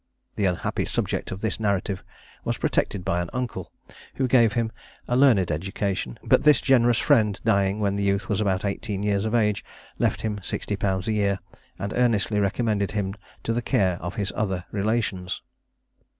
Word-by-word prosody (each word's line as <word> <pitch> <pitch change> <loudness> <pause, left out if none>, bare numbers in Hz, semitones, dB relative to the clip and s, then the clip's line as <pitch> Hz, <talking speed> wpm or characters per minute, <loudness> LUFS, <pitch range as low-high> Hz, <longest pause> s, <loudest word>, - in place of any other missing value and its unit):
The 100 - 0
unhappy 90 -2 0
subject - - -2
of 95 - -5
this 110 -1 -1
narrative 100 -2 -1 0.4
was - - -1
protected 95 -3 0
by 90 +1 +1
an 85 - -4
uncle, 125 -1 -4 0.4
who 130 - +1
gave 120 -4 +5
him 115 0 0 0.4
a 120 - +1
learned 120 -10 +5
education; 95 -4 -2
but - - +4
this 150 -1 +6
generous 120 -3 +4
friend 110 -9 +3
dying 100 +1 +2
when 100 -1 0
the - - -1
youth 100 0 +1
was 105 -1 0
about 95 -1 0
eighteen 100 0 -2
years 100 0 +1
of 110 +1 0
age, 105 -3 +2 0.4
left - - +1
him 105 -2 -2
sixty 105 - -3
pounds 95 -1 -1
a - - +1
year, 100 -2 +1 0.4
and 100 +3 -4
earnestly 110 -4 +2
recommended 100 -1 0
him 100 -2 -1 0.3
to 115 - 0
the 120 - 0
care 95 -6 +1
of 90 +1 -5
his 100 -2 -2
other 95 -4 -1
relations. 100 -3 -1
100 Hz, 180 wpm, -25 LUFS, 95-110 Hz, 0.4 s, this